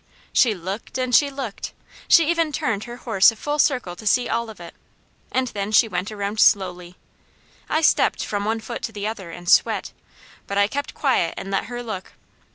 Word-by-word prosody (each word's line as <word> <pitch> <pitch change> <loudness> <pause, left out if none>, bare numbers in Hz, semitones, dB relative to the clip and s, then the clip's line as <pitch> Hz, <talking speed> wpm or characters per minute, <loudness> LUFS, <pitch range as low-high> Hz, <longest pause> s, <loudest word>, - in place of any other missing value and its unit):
She 230 -4 +4
looked 190 +8 -6
and 255 -1 -2
she 285 +4 +5
looked. 270 -7 -6 0.3
She 330 -3 +6
even 330 -2 +1
turned 220 -7 -2
her 240 - -8
horse 225 -5 +4
a - - -12
full 295 +6 -3
circle 250 - +1
to 215 +4 -8
see 245 +3 +3
all 235 0 -1
of 215 - -11
it, 170 -1 -10 0.6
and 215 -5 -1
she 225 - +6
went 185 0 -3
around 205 0 -4
slowly. 180 -4 +2 0.7
I 315 - +1
stepped 315 - +3
from 205 -1 -2
one 220 +2 -1
foot 235 +2 -6
to - - -4
the 205 -2 -5
other 210 -5 -5
and 175 +1 -10
sweat; - - +3 0.6
but 200 - -3
I 200 - +5
kept 280 +7 -4
quiet 260 - +1
and 195 - -6
let 195 - 0
her 245 +1 -6
look. 215 -5 -6
220 Hz, 195 wpm, -22 LUFS, 195-250 Hz, 0.7 s, She